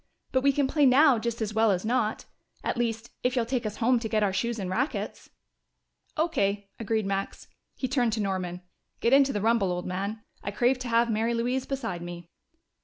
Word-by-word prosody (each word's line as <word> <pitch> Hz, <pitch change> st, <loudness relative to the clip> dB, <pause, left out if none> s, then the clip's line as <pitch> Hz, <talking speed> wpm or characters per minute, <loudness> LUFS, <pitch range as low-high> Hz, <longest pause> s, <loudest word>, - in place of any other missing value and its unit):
"But 260 Hz, -, +2 dB
we 280 Hz, +1 st, +4 dB
can 275 Hz, 0 st, +1 dB
play 290 Hz, 0 st, +3 dB
now 265 Hz, -1 st, +6 dB
just 235 Hz, 0 st, -2 dB
as 215 Hz, 0 st, -3 dB
well 220 Hz, 0 st, +3 dB
as 185 Hz, 0 st, 0 dB
not 225 Hz, -2 st, 0 dB, 0.4 s
at -, -, -1 dB
least, 235 Hz, -1 st, -2 dB
if 250 Hz, +1 st, 0 dB
you'll 240 Hz, -2 st, +1 dB
take 240 Hz, -1 st, -1 dB
us 210 Hz, -, -5 dB
home 245 Hz, +1 st, +2 dB
to 225 Hz, -1 st, -4 dB
get 215 Hz, -1 st, +2 dB
our 195 Hz, -2 st, +1 dB
shoes 235 Hz, +4 st, -1 dB
and 195 Hz, -3 st, -3 dB
rackets." 245 Hz, +11 st, -3 dB, 0.9 s
"O.K.," 200 Hz, -11 st, 0 dB
agreed 220 Hz, -1 st, 0 dB
Max. 195 Hz, 0 st, -3 dB, 0.3 s
He 260 Hz, -, -2 dB
turned 245 Hz, -4 st, +1 dB
to 220 Hz, -, -1 dB
Norman. 185 Hz, -3 st, -2 dB, 0.4 s
"Get 235 Hz, -, +2 dB
into 275 Hz, 0 st, +6 dB
the 205 Hz, -, -2 dB
rumble, 225 Hz, -4 st, +2 dB
old 180 Hz, 0 st, -3 dB
man. 200 Hz, +4 st, -3 dB, 0.2 s
I -, -, -4 dB
crave 245 Hz, +5 st, +2 dB
to 255 Hz, -, -5 dB
have 235 Hz, 0 st, +3 dB
Mary 225 Hz, +2 st, +1 dB
Louise 250 Hz, +3 st, -1 dB
beside 265 Hz, -11 st, -3 dB
me." 175 Hz, -1 st, -8 dB
225 Hz, 205 wpm, -27 LUFS, 200-250 Hz, 0.9 s, now